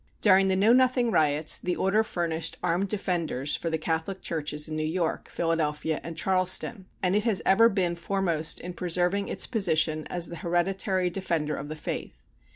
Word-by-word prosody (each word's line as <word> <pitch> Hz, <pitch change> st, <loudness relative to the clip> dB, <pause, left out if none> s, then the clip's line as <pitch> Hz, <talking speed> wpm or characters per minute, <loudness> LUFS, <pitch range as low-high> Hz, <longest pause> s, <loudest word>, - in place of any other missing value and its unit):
During 195 Hz, -2 st, +5 dB
the 190 Hz, -, +1 dB
Know 205 Hz, +5 st, +4 dB
Nothing 250 Hz, -2 st, +3 dB
riots, 155 Hz, -3 st, +3 dB
the 180 Hz, -1 st, -2 dB
Order 195 Hz, +3 st, +2 dB
furnished 165 Hz, -5 st, -3 dB
armed 180 Hz, +4 st, 0 dB
defenders 170 Hz, -8 st, -2 dB
for 165 Hz, -, -3 dB
the 160 Hz, -, -1 dB
Catholic 160 Hz, +4 st, -3 dB
churches 150 Hz, -2 st, -3 dB
in 155 Hz, -, -5 dB
New 155 Hz, -, -2 dB
York, 165 Hz, +1 st, -2 dB
Philadelphia, 160 Hz, -2 st, -1 dB
and 165 Hz, -1 st, -7 dB
Charleston, 185 Hz, +3 st, +1 dB, 0.2 s
and 185 Hz, +1 st, +2 dB
it 210 Hz, -, +1 dB
has 215 Hz, -7 st, +2 dB
ever 230 Hz, +4 st, +5 dB
been 180 Hz, -4 st, 0 dB
foremost 170 Hz, -3 st, -1 dB
in 180 Hz, +1 st, -7 dB
preserving 180 Hz, +3 st, 0 dB
its -, -, +1 dB
position 160 Hz, -8 st, +1 dB
as 175 Hz, -1 st, 0 dB
the 170 Hz, -, -7 dB
hereditary 180 Hz, +2 st, 0 dB
defender 165 Hz, -5 st, -2 dB
of 145 Hz, +2 st, -7 dB
the 155 Hz, -, -5 dB
faith. 155 Hz, -, -6 dB
175 Hz, 175 wpm, -27 LUFS, 160-195 Hz, 0.2 s, During